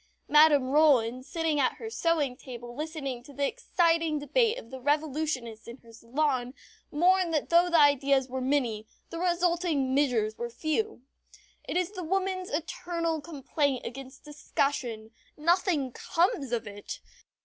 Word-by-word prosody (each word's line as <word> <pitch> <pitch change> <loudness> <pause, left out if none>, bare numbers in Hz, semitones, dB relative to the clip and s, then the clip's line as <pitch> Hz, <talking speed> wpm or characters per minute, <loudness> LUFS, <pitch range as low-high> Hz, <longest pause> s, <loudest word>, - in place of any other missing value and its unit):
Madame 295 -3 +5
Roland, 255 -5 +4
sitting 320 0 -1
at 260 - +2
her 450 - -8
sewing 330 - 0
table 240 -2 -9
listening 295 -4 -4
to 255 - -14
the 280 +1 0
excited 330 - +1
debate 450 - +1
of 230 - -10
the 260 - -7
Revolutionists 290 -5 -1
in 235 +2 -8
her 230 -3 -18
salon, 255 +2 -1 0.4
mourned 360 +3 +3
that 300 - -1
though 345 +1 +5
the 340 - +3
ideas 280 -2 +4
were 260 0 -4
many, 250 -6 0 0.2
the 335 - -5
resulting 345 -6 +1
measures 240 -6 +1
were 240 0 -3
few. 315 - -2 0.6
It - - -2
is 365 +1 0
the 370 -4 -6
woman's 375 +1 -1
eternal 330 +1 -2
complaint 285 -3 -2
against 265 +3 -9
discussion 275 -6 -2 0.3
nothing 320 -4 +1
comes 335 - 0
of 235 -2 -1
it. 205 0 -8
290 Hz, 145 wpm, -28 LUFS, 255-335 Hz, 0.6 s, Madame